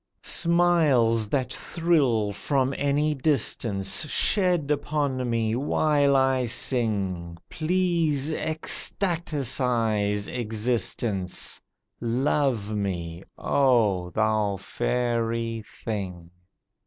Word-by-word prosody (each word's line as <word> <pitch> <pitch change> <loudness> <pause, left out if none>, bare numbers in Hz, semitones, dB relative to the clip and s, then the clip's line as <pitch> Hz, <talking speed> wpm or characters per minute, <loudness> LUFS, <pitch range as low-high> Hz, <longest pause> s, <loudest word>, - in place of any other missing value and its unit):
"Smiles 155 -11 +3
that 130 -1 -1
thrill 140 -11 0
from 135 +5 -1
any 145 +2 0
distance 115 -6 +1
Shed 180 -7 +2
upon 145 -4 -1
me 115 -1 0
while 145 +1 +1
I 130 -2 +2
sing! 100 -9 -1
Please 160 -4 0
ecstaticize 125 - 0
existence, 110 -4 -2 0.4
Love 120 -3 -1
me, 85 -4 -4 0.2
oh, 110 -10 +1
thou 110 +1 0
fairy 115 +1 -2 0.2
thing!" 90 -6 -5
125 Hz, 75 wpm, -25 LUFS, 105-145 Hz, 0.4 s, Smiles